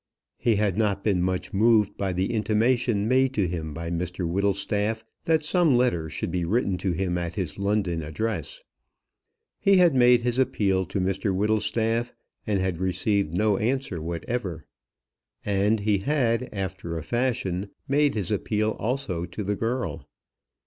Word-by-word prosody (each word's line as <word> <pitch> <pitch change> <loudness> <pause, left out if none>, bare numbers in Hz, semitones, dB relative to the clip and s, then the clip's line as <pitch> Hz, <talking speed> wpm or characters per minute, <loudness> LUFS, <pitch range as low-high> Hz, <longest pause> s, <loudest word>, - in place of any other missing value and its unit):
He 115 -2 +2
had 105 -1 0
not 100 -2 +1
been 95 -5 +2
much 90 0 -2
moved 105 0 +3
by 95 -1 -2
the 95 +4 -1
intimation 110 0 +1
made 130 +2 +2
to 100 -4 +2
him 80 -2 -4
by 85 +2 -5
Mr 90 +1 -2
Whittlestaff 100 +4 0 0.2
that 160 -2 +2
some 160 -5 +3
letter 85 -11 +1
should 80 - -4
be 90 0 -1
written 100 +2 +1
to 90 0 0
him 90 0 -1
at 85 -1 -4
his 90 -3 -4
London 100 -4 0
address. 110 - -4 1.0
He 195 -1 +4
had 175 -4 +5
made 125 -2 +5
his 120 +1 0
appeal 95 -7 +1
to 95 +3 -3
Mr 95 +2 0
Whittlestaff, 110 +3 0 0.3
and 105 -2 +1
had 95 -3 -1
received 95 -1 0
no 105 -1 +2
answer 115 -7 -1
whatever. 85 +1 -4 0.8
And 105 +2 +1
he 105 -1 +2
had, 125 0 0
after 95 -4 -4
a 80 - -5
fashion, 115 -6 -1 0.2
made 145 0 +2
his 105 0 -2
appeal 110 +1 0
also 110 -8 -2
to 90 +5 -6
the 100 +1 -1
girl. 120 +5 -3
105 Hz, 155 wpm, -25 LUFS, 90-120 Hz, 1.0 s, had